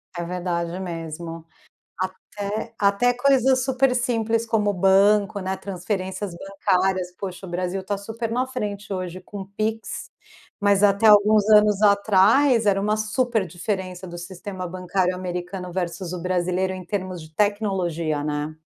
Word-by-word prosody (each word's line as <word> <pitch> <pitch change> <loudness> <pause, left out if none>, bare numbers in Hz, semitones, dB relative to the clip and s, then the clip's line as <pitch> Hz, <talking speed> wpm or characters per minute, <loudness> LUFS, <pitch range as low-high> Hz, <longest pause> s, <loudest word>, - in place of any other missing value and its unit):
É 170 - -3
verdade 175 0 -3
mesmo. 165 -2 -6 0.6
Até 205 +4 -4
até 205 +5 +3
coisas 260 0 +3
super 260 -1 +2
simples 230 -2 0
como 210 -2 +1
banco, 200 +2 +4
né, 190 0 -2
transferências 190 0 -4
bancárias, 185 -1 0
poxa, 190 0 -6
o - - -9
Brasil 180 +2 -2
tá 205 0 -2
super 225 +3 -5
na 250 +2 0
frente 210 -6 -5
hoje 185 -1 -4
com 200 +1 -8
o - - -11
PIX, 220 +3 -4 0.5
mas 200 0 +3
até 200 +2 +4
alguns 210 0 +6
anos 210 -1 +6
atrás 215 +5 +4
era 195 -1 +3
uma 210 +1 +1
super 215 -1 0
diferença 185 +1 -4
do 175 0 -8
sistema 185 +1 -6
bancário 180 +1 -1
americano 180 0 -5
versus 180 0 -3
o 180 - -4
brasileiro 185 +1 0
em 185 -1 -7
termos 185 -3 -4
de 155 0 -14
tecnologia, 180 -7 0
né. 150 +1 -2
195 Hz, 145 wpm, -23 LUFS, 180-210 Hz, 0.6 s, alguns